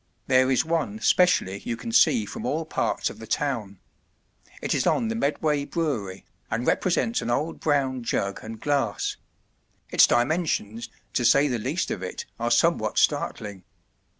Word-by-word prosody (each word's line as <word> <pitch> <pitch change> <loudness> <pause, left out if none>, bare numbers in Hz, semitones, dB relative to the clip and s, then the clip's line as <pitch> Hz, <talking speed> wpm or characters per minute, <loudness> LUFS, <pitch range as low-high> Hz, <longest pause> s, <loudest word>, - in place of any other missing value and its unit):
There 130 0 +4
is 130 - +2
one 160 -11 -1
specially 110 - +3
you 115 - -4
can 230 - -6
see 235 0 +4
from 225 - -7
all 160 -6 -1
parts - - -1
of - - -13
the 110 - -9
town. 110 -10 -2 0.8
It - - -1
is - - +1
on 230 - +1
the 225 - -2
Medway 150 -5 0
Brewery, 125 - -3 0.2
and 120 +3 -2
represents 225 +6 +1
an - - -4
old 150 +7 -1
brown 135 -4 0
jug 100 -4 -2
and 110 0 -8
glass; 135 -6 -1 0.7
its - - +6
dimensions, 120 - 0 0.2
to 120 - 0
say 140 +4 +5
the 125 -4 -1
least 140 +11 -2
of 95 - -3
it, 90 - -5
are - - 0
somewhat - - +2
startling. 100 -3 0
130 Hz, 160 wpm, -25 LUFS, 110-160 Hz, 0.8 s, its